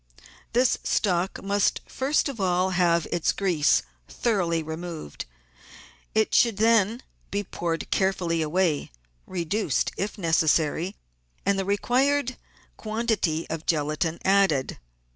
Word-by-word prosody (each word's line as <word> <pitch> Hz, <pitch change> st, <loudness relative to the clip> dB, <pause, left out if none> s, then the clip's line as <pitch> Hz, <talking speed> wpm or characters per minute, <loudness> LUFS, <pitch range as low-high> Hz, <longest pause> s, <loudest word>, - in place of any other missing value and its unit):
This 250 Hz, +1 st, +3 dB
stock 185 Hz, -2 st, 0 dB
must 200 Hz, 0 st, +1 dB
first 275 Hz, +4 st, 0 dB
of 260 Hz, -7 st, -5 dB
all 185 Hz, 0 st, +1 dB
have 170 Hz, -2 st, +2 dB
its 170 Hz, -2 st, +1 dB
grease 175 Hz, -7 st, +2 dB, 0.3 s
thoroughly 175 Hz, -8 st, 0 dB
re 160 Hz, +1 st, -5 dB
moved; 165 Hz, -, -7 dB, 0.9 s
it 220 Hz, -1 st, +2 dB
should 230 Hz, -4 st, +4 dB
then 225 Hz, +1 st, +3 dB, 0.3 s
be 205 Hz, +1 st, -2 dB
poured 170 Hz, -3 st, -4 dB
carefully 180 Hz, -4 st, +1 dB
away, 160 Hz, -1 st, 0 dB, 0.4 s
reduced 180 Hz, -, -1 dB
if 205 Hz, +3 st, -3 dB
necessary, 165 Hz, +1 st, +1 dB, 0.5 s
and 200 Hz, -1 st, +2 dB
the 195 Hz, -, -1 dB
required 255 Hz, +6 st, +1 dB, 0.4 s
quantity 215 Hz, -8 st, -1 dB
of 160 Hz, 0 st, -5 dB
gelatine 155 Hz, +1 st, 0 dB
added. 190 Hz, -9 st, +2 dB
185 Hz, 115 wpm, -25 LUFS, 165-215 Hz, 0.9 s, should